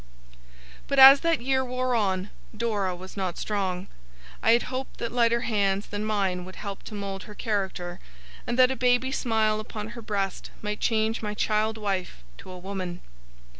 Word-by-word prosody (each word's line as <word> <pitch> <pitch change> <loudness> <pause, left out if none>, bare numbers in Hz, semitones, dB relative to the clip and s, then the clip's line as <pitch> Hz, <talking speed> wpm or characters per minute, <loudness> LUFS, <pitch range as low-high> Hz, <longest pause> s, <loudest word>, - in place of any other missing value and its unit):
But, 275 - -1
as 270 +1 +11
that 330 -4 +1
year 260 +1 +1
wore 255 0 -1
on, 195 -3 0 0.3
Dora 205 -5 0
was 185 +1 -11
not 185 -3 -3
strong. 190 -3 -2 0.6
I 225 - +5
had 235 - +3
hoped 260 +1 -5
that 235 - -3
lighter 235 -1 +3
hands 200 -3 +1
than 205 0 -4
mine 195 -4 0
would 185 +1 -10
help 200 -2 -6
to 215 - -7
mould 195 -1 -5
her 210 - -11
character, 190 -5 -2 0.5
and 240 - -1
that 255 0 +6
a - - -1
baby 250 +1 +2
smile 220 -4 +1
upon 215 0 -6
her 235 0 -8
breast 200 -3 -3
might 210 0 -3
change 220 0 +1
my 210 -1 -3
child 215 +1 +1
wife 190 - -3 0.2
to - - -11
a 185 - -8
woman. 185 -1 -5
215 Hz, 175 wpm, -26 LUFS, 195-235 Hz, 0.6 s, as